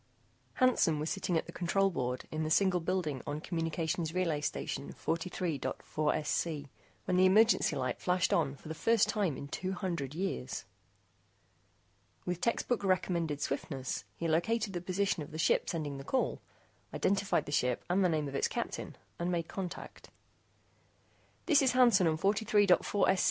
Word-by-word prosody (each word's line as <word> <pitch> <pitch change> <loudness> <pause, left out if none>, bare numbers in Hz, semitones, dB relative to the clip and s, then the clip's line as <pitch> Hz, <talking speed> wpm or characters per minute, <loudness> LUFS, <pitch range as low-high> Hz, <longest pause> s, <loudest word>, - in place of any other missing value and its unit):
] - - -37
Hansen 240 -11 +4
was 155 +2 -2
sitting 185 -3 0
at - - -1
the - - -9
control 195 +3 +1
board 125 -5 -3
in 155 - -2
the 155 - -1
single 185 +2 +3
building 165 -6 -2
on 145 +1 -2
Communications 165 0 -2
Relay 165 -5 0
Station 145 - -3
43.4SC, 155 -2 -2 0.4
when 180 - +1
the 185 +1 +6
emergency 215 -4 +4
light 130 -2 -2
flashed 180 0 +1
on 145 -4 +1
for 140 - -14
the 160 - -4
first 225 +6 +3
time 195 -10 0
in 140 - -7
two 185 +6 -3
hundred 170 -7 -3
years. 165 - -3 1.6
With 180 -1 -3
textbook 235 +1 0
recommended 170 -5 0
swiftness, 135 -2 -3
he 170 - -3
located 200 +6 +1
the 175 - -3
position 185 0 0
of 145 - -7
the 155 - -7
ship 160 - +2
sending 150 -4 -3
the - - -7
call, 260 - -1 0.5
identified 200 0 +1
the - - -7
ship 125 -4 0
and 185 +2 +2
the 180 - +4
name 155 -3 0
of 135 - -6
its 140 - +1
captain, - - -4 0.2
and 175 +1 -1
made 170 -2 -1
contact. 185 -3 -7 1.4
"This 305 -5 +5
is 260 -2 +3
Hansen 235 -8 +5
on 160 -1 +1
43.4SC. 205 -1 +3
170 Hz, 160 wpm, -32 LUFS, 155-195 Hz, 1.6 s, the